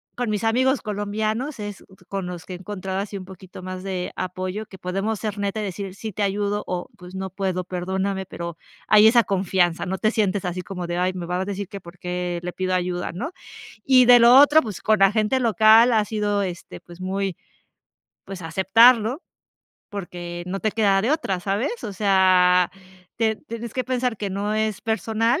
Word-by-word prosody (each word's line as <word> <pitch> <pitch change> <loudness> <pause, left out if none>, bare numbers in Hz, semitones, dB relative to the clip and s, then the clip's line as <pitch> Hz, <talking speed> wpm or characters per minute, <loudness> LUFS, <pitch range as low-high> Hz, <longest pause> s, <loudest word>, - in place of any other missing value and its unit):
con 245 -2 -2
mis 210 0 -1
amigos 260 +4 +2
colombianos 215 +6 -3
es 205 -1 -6 0.3
con 195 -2 -3
los 180 -1 -7
que - - -11
he - - -6
encontrado 190 0 -5
así 200 0 -4
un 185 - -7
poquito 185 0 -12
más 185 0 -6
de 185 -2 -3
apoyo, 185 +3 -4
que 190 - -13
podemos 195 +4 -2
ser 210 -1 -4
netas 200 +2 -2
y - - -3
decir, 195 -1 -5
sí 215 +2 -6
te 205 +2 -2
ayudo, 205 +1 0
o 180 -1 -4
pues 180 +1 -12
no 190 0 -4
puedo, 185 -1 -2
perdóname, 190 +2 -3
pero 170 -2 -7 0.3
hay 215 0 +7
esa 235 0 +5
confianza, 185 -3 0
no 190 +1 -2
te 215 +2 +1
sientes 205 -3 0
así 180 0 -3
como 180 -2 -6
de, 175 - -3
ay, 180 +1 +1
me 180 -2 -5
vas 180 +1 -2
a - - -2
decir 200 -1 -5
que 200 - -7
por 175 -1 -14
qué 180 -1 -3
le 180 - -3
pido 185 +1 -2
ayuda, 180 -1 -2
¿no? 205 - -4 0.5
Y 255 -2 +6
de 245 -1 +9
lo 235 +1 +7
otro, 295 +2 +7
pues, 215 -6 -7
con 215 -2 +2
la 195 0 +6
gente 220 +4 +1
local 225 0 +5
ha 215 - +3
sido, 205 -2 -1
este, 175 -2 -7
pues, 175 +1 -14
muy 190 0 -2 0.9
pues, 190 -2 -8
aceptarlo, 225 - +4 0.7
porque 175 -3 -6
no 190 +2 -3
te 215 - 0
queda 200 -3 +3
de 230 - +1
otra, 200 - -1
¿sabes? 210 - -2
O 205 - -4
sea, 185 -2 +4 0.5
te 220 -1 +1
tienes 230 +2 -8
que 255 - -1
pensar 250 -2 -1
que 200 -1 -4
no 200 +2 -2
es 215 -1 -1
personal 225 - 0
195 Hz, 200 wpm, -23 LUFS, 185-220 Hz, 0.9 s, de